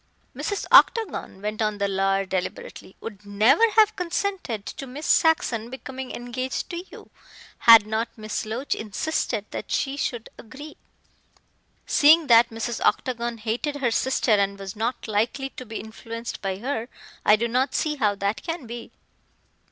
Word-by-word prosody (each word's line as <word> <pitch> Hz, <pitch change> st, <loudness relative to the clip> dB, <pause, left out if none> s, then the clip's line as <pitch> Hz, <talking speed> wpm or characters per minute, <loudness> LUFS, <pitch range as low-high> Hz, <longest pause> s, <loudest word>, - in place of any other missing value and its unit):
"Mrs. 405 Hz, -, -3 dB
Octagon," 420 Hz, -, +4 dB
went 215 Hz, +1 st, -3 dB
on 215 Hz, -1 st, 0 dB
the 200 Hz, 0 st, 0 dB
lawyer 195 Hz, 0 st, +1 dB
deliberately, 190 Hz, 0 st, -5 dB
"would 210 Hz, -3 st, -8 dB
never 220 Hz, -, +4 dB
have 430 Hz, -1 st, +5 dB
consented 360 Hz, -, -3 dB
to 275 Hz, +2 st, -7 dB
Miss 285 Hz, +5 st, -7 dB
Saxon 240 Hz, -8 st, +2 dB
becoming 260 Hz, 0 st, -7 dB
engaged 255 Hz, +5 st, -4 dB
to 345 Hz, 0 st, -5 dB
you -, -, -14 dB, 0.5 s
had 230 Hz, -3 st, +8 dB
not 220 Hz, +2 st, -2 dB
Miss 215 Hz, -1 st, -4 dB
Loach 230 Hz, +6 st, -3 dB
insisted 220 Hz, +9 st, -2 dB
that -, -, -6 dB
she 275 Hz, 0 st, -1 dB
should 240 Hz, -5 st, -3 dB
agree." 285 Hz, +7 st, -11 dB, 1.1 s
"Seeing 315 Hz, +2 st, +5 dB
that 235 Hz, -2 st, +6 dB
Mrs. 225 Hz, 0 st, -4 dB
Octagon 235 Hz, -2 st, 0 dB
hated 235 Hz, +7 st, -2 dB
her 265 Hz, -5 st, 0 dB
sister 260 Hz, 0 st, +1 dB
and 200 Hz, -1 st, +2 dB
was 195 Hz, 0 st, -7 dB
not 230 Hz, +3 st, -3 dB
likely, 230 Hz, +6 st, -1 dB
to 255 Hz, -, -10 dB
be 220 Hz, -, -5 dB
influenced 230 Hz, +1 st, -7 dB
by 195 Hz, -1 st, -2 dB
her, 235 Hz, +1 st, -3 dB, 0.3 s
I 210 Hz, -, +6 dB
do 235 Hz, +2 st, -1 dB
not 255 Hz, +3 st, 0 dB
see 300 Hz, -1 st, 0 dB
how 210 Hz, -6 st, +1 dB
that 200 Hz, +2 st, -2 dB
can 330 Hz, -5 st, -5 dB
be." 235 Hz, 0 st, -8 dB
235 Hz, 155 wpm, -24 LUFS, 215-275 Hz, 1.1 s, had